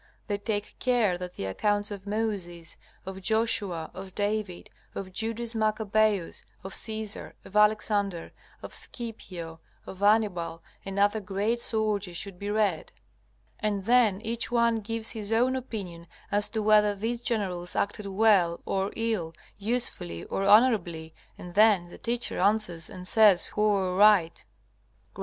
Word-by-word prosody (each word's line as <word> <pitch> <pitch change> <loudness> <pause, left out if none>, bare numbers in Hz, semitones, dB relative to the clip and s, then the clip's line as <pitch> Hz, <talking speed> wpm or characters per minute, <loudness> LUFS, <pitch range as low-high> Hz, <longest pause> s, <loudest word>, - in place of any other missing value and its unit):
They 205 -2 -2
take 205 -1 -4
care 240 -7 +2
that 180 0 -7
the - - -4
accounts 205 - 0
of 200 -1 -8
Moses, 195 -6 -3 0.3
of 190 0 -7
Joshua, 205 -6 +1
of 190 0 -9
David, 205 -3 -3 0.2
of 190 -1 -6
Judas 230 +3 0
Maccabaeus, 215 -3 0 0.2
of 190 - -6
Caesar, 220 -2 -4
of 200 - -13
Alexander, 210 -4 +2 0.3
of - - -8
Scipio, 180 -9 -5 0.3
of 190 - -9
Hannibal, 200 -6 +1 0.2
and 195 0 -6
other 205 +2 +3
great 205 +4 -1
soldiers 210 -6 -1
should 195 -1 -6
be 205 - -4
read. 205 -6 0 0.7
And 210 -3 -1
then 225 -3 +4
each 230 +1 -3
one 235 -1 +3
gives 225 +1 -1
his 215 -2 -4
own 245 +3 +2
opinion 195 -10 -6 0.2
as 205 0 +4
to 220 -2 -2
whether 210 -1 +4
these 230 +4 -3
generals 185 -7 -1
acted 205 0 -2
well 195 -4 +3
or 195 +1 -1
ill, 215 -8 -2 0.2
usefully 200 - -2
or - - -3
honorably, 195 -8 +3 0.2
and 175 -1 -10
then 200 -4 +4
the - - -12
teacher 240 +1 -2
answers 190 -4 +1
and 180 0 -9
says 210 -5 +5
who 210 - -1
are 190 -3 +1
right. 195 -5 +4 0.7
G.M. - - -16
205 Hz, 145 wpm, -27 LUFS, 185-220 Hz, 0.7 s, says